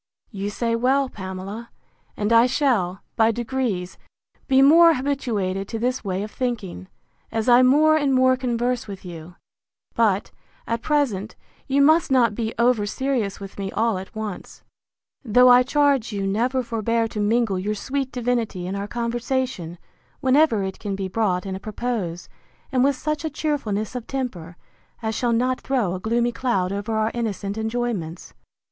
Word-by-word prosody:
You 200 -1 -4
say 230 +2 -1
well, 260 +3 +2
Pamela; 195 +4 -7 0.5
and 210 +2 +1
I 230 +2 +6
shall, 230 -10 0
by 225 -1 +4
degrees, 230 -6 -2 0.5
be 265 -1 +5
more 330 +3 +7
habituated 220 -8 -2
to 225 - -4
this 250 +3 -1
way 190 -1 -2
of 210 - -7
thinking, 215 -8 -4 0.4
as 225 +1 -2
I 245 0 +7
more 300 +5 +5
and 285 -3 +1
more 255 0 +4
converse 245 -1 -1
with 195 -2 -9
you; 170 0 -9 0.6
but, 210 -3 +1 0.3
at 230 0 -2
present, 235 -10 0 0.3
you 280 +1 +3
must 315 +3 +4
not 245 -5 +3
be 220 0 -2
over 235 -3 +2
serious 245 -4 -2
with 195 0 -9
me 195 0 -3
all 225 -3 +1
at 190 - -11
once: 215 -4 -7 0.6
though 250 +1 +5
I 245 0 +8
charge 275 -2 +2
you 200 -2 -2
never 245 +6 0
forbear 230 0 0
to 215 - -5
mingle 210 -2 +1
your 210 +3 -2
sweet 265 +4 -3
divinity 235 -7 -2
in 190 +2 -3
our 200 0 -4
conversation, 235 -6 -2 0.4
whenever 260 -5 +3
it 190 0 -5
can 200 -2 -3
be 195 -1 -4
brought 185 -3 0
in 190 - -4
a - - -6
propos, 210 -5 -4 0.4
and 255 -2 +2
with 280 0 +3
such 305 +3 -3
a 315 - -1
cheerfulness 270 -9 -2
of 245 -2 -5
temper, 180 -11 -5 0.5
as 220 0 -1
shall 240 +1 0
not 255 +3 +1
throw 245 -10 0
a 185 - -4
gloomy 235 +4 0
cloud 230 -7 -1
over 205 +3 -3
our 220 +1 +1
innocent 205 -4 -3
enjoyments. 220 -7 -3
230 Hz, 165 wpm, -23 LUFS, 200-255 Hz, 0.6 s, I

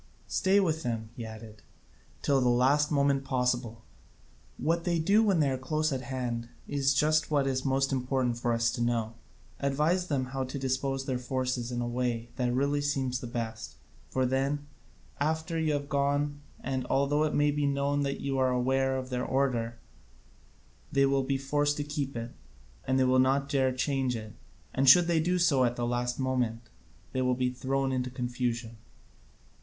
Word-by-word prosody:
Stay 195 +1 +2
with 160 -5 +1
them," 115 -4 -3
he 120 - -6
added, 110 -1 -10 0.6
"till 140 -2 +3
the 125 - +3
last 135 +5 +3
moment 140 -1 +2
possible: 125 -3 -1 0.7
what 165 +2 0
they 175 -1 +1
do 195 +7 +4
when 200 -6 +3
they 145 -2 +3
are 130 - -2
close 155 +4 0
at 130 - -2
hand 120 -2 -4 0.2
is 140 -1 +1
just 155 +1 +2
what 145 -3 +2
is 130 -1 -1
most 135 0 +1
important 130 -2 0
for 120 0 -1
us 115 0 +2
to 120 - -4
know. 115 -2 0 0.5
Advise 150 +6 +1
them 135 -5 0
how 135 0 -1
to 130 +2 -5
dispose 135 0 -1
their 130 -2 -1
forces 125 -1 -2
in 120 - -3
the 120 - -1
way 120 -1 -2
that 125 -2 0
really 140 +3 +1
seems 135 -3 -1
the 125 - -6
best, 115 -1 -5 0.3
for 130 -1 +1
then, 135 +3 0 0.5
after 160 +2 -1
you 155 -2 +1
are 145 - -1
gone 145 0 0 0.2
and 130 -1 -2
although 140 +3 +2
it 155 - 0
may 145 0 +3
be 145 0 0
known 140 +1 0
that 140 -1 -2
you 135 -1 -1
are 130 0 +3
aware 130 +1 +1
of 130 0 -6
their 125 0 -1
order, 125 -4 0 1.1
they 140 0 +4
will 135 0 +2
be 135 +1 0
forced 145 +2 0
to 145 - -1
keep 145 -2 -4
to 115 - -2
it, 115 +1 -7 0.7
they 130 - +4
will 130 0 +4
not 135 +2 +3
dare 135 -2 +2
to 130 - -5
change 135 -2 0
it, 110 -1 -7 0.4
and 135 0 +4
should 175 +5 +8
they 170 -1 +2
do 180 +3 +1
so 145 -7 +3
at 120 -1 +1
the 120 - -2
last 120 +1 -1
moment 125 -3 0 0.5
they 130 - -1
will 125 0 +2
be 125 0 0
thrown 135 +1 -1
into 125 -1 -1
confusion." 120 -2 -3
135 Hz, 190 wpm, -29 LUFS, 125-145 Hz, 1.1 s, should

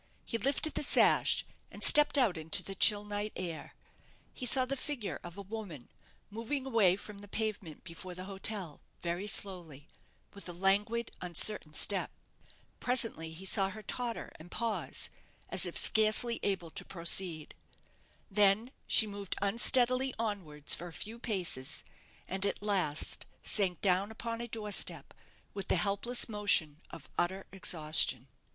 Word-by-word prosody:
He 230 - -4
lifted 275 +6 +3
the - - -1
sash, 295 - +3 0.2
and - - -8
stepped 295 0 +8
out 235 -9 +2
into 160 +4 +1
the 195 - -7
chill 205 +1 +3
night 205 +1 -4
air. 165 -5 -6 0.6
He 250 - -2
saw 255 +1 +6
the 275 +2 -3
figure 265 -6 -5
of 175 +2 -10
a 200 - -7
woman 195 - -9 0.4
moving 230 +6 -4
a 265 - -7
way 200 -6 +3
from 205 +1 -10
the 205 - -13
pavement 205 -6 -5
before 180 +1 -9
the 185 - -8
hotel 195 -4 -6 0.2
very 175 +4 -3
slowly, 170 -8 -4 0.4
with 200 -2 -10
a - - -7
languid, 205 +6 0
uncertain 175 -2 +4
step. 195 +3 +2 0.7
Presently 225 -10 +3
he 170 +4 -10
saw 195 0 +2
her 215 +2 -10
totter 235 +2 -5
and 160 +3 -13
pause, 230 +2 -3 0.4
as - - +1
if - - -3
scarcely 220 +2 +3
able 190 -5 -3
to - - -5
proceed. 170 -2 +1 0.8
Then 205 +4 +2 0.2
she 220 - +6
moved 200 -2 -6
unsteadily 250 +5 +2
onwards 180 -10 -2
for 175 - -6
a 170 - -11
few 225 +6 -8
paces, 180 - -1 0.4
and 190 +1 -1
at 200 - -5
last 185 -8 0 0.2
sank 185 -5 +1
down 190 +1 +1
upon 230 +1 -6
a 235 - -5
door 215 -2 -6
step, - - 0 0.4
with 195 - -6
the - - +2
helpless 200 +7 +2
motion 200 -8 +2
of - - -12
utter 190 +2 -2
exhaustion. 155 -8 0
200 Hz, 155 wpm, -31 LUFS, 175-225 Hz, 0.8 s, stepped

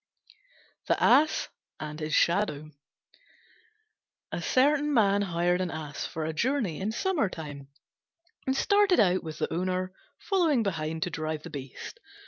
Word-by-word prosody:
THE - - +2
ASS 310 +2 +4 0.3
AND 150 0 -6
HIS 155 0 -1
SHADOW 160 -5 +1 1.6
A - - -3
certain 295 +3 +3
man 200 -3 +4
hired 175 -1 +1
an 185 - -1
Ass 155 -3 -5
for 160 -1 -4
a 160 - -2
journey 230 - 0
in 205 +3 -1
summertime, 180 - -2 0.8
and 265 0 +1
started 405 0 +4
out 185 -3 +3
with 160 -2 -6
the - - -2
owner 185 +1 -1 0.2
following 330 - +2
behind 160 -4 -2
to 180 - -3
drive 155 -1 -3
the - - -9
beast. 135 -2 -8
185 Hz, 135 wpm, -28 LUFS, 155-255 Hz, 1.6 s, ASS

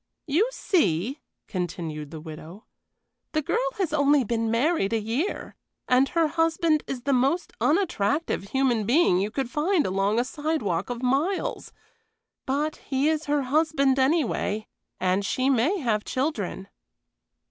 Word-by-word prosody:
"You 335 - +2
see," 255 - 0 0.3
continued 165 -5 -4
the 160 0 -8
widow, 160 +6 -10 0.7
"the 310 - +1
girl - - 0
has 370 -6 -1
only 285 -2 +4
been 230 0 -1
married 230 - +1
a 225 - +2
year, 230 - -3 0.3
and 255 +2 +4
her 335 -1 +2
husband 325 0 +1
is 255 -3 -5
the 280 +1 +1
most 275 +8 +1
unattractive 295 - +1
human 240 -2 +1
being 245 - +4
you 200 +2 0
could 255 +2 -3
find 320 +2 +1
along 195 +4 +1
a - - +2
sidewalk 255 - -2
of 245 0 -5
miles; 285 +10 0 0.8
but 295 +3 -1
he 275 +2 0
is 315 -1 -1
her 290 -1 +1
husband, 275 -1 +2
anyway, 260 -7 +1 0.3
and 185 +2 +1
she 260 +6 +1
may 275 - +2
have 225 - 0
children." 235 - -3
265 Hz, 140 wpm, -25 LUFS, 210-310 Hz, 0.8 s, only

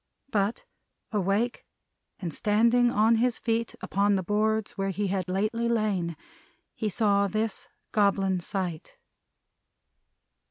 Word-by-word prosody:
But, 205 +2 0 0.5
awake, 210 +4 0 0.6
and 175 -6 -4
standing 235 +6 +3
on 225 +1 +3
his 240 +1 +1
feet 230 0 -1
upon 200 +1 +2
the 190 - 0
boards 215 +2 0
where 195 -1 -2
he 195 +1 -1
had 185 -2 -2
lately 215 +5 0
lain, 200 -8 0 0.6
he 220 - -2
saw 200 -1 +2
this 215 +1 -3 0.2
Goblin 195 -3 +2
Sight. 175 -2 -4
205 Hz, 115 wpm, -27 LUFS, 195-225 Hz, 0.6 s, standing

